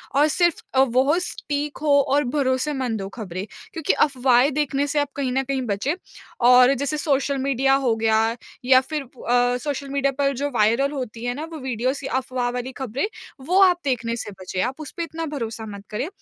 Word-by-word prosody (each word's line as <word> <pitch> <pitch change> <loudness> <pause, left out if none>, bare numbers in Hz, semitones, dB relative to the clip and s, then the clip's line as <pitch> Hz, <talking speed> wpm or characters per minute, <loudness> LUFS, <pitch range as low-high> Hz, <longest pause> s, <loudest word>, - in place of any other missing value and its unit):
और 290 +2 +5
सिर्फ 345 +2 +1
अ, 260 - +3
वोह 265 +4 +3
स्पीक 295 -4 -4
हो 290 -2 +4
और 285 +1 +2
भरोसेमंद 260 -4 0
हो 195 - -5
ख़बरें। 185 -2 -5 0.3
क्योंकि 320 -3 0
अफ़वाहें 260 -1 +3
देखने 285 -1 0
से 295 +1 0
आप 290 -1 0
कहीं 270 -3 -1
न 265 +1 +1
कहीं 270 0 -2
बचें। 205 +10 0 0.6
और 250 +1 +7
जैसे 280 +3 -2
सोशल 280 -2 0
मीडिया 270 0 +2
हो 240 -4 +2
गया 225 0 +2 0.3
या 260 0 +6
फिर 300 +3 -4
अ, 245 -1 0
सोशल 280 +1 -4
मीडिया 275 0 +1
पर 280 -1 +2
जो 285 +3 -1
वायरल 235 +4 +2
होती 245 -5 -5
हैं 245 - 0
ना 295 - -5
वो 320 - -6
वीडियोज़ 255 +1 -2
कि 270 - -4
अफ़वाह 255 -1 -1
वाली 250 +1 -4
खबरें? 265 - -2 0.3
वो 355 +8 +2
आप 360 -2 +5
देखने 235 -3 -1
से 210 - -6
बचें। 185 0 -3
आप 260 +4 -3
उसपे 310 +3 -5
इतना 330 0 -5
भरोसा 230 -7 -5
मत 200 -2 -8
करें। 215 +7 -3
265 Hz, 195 wpm, -23 LUFS, 245-285 Hz, 0.6 s, और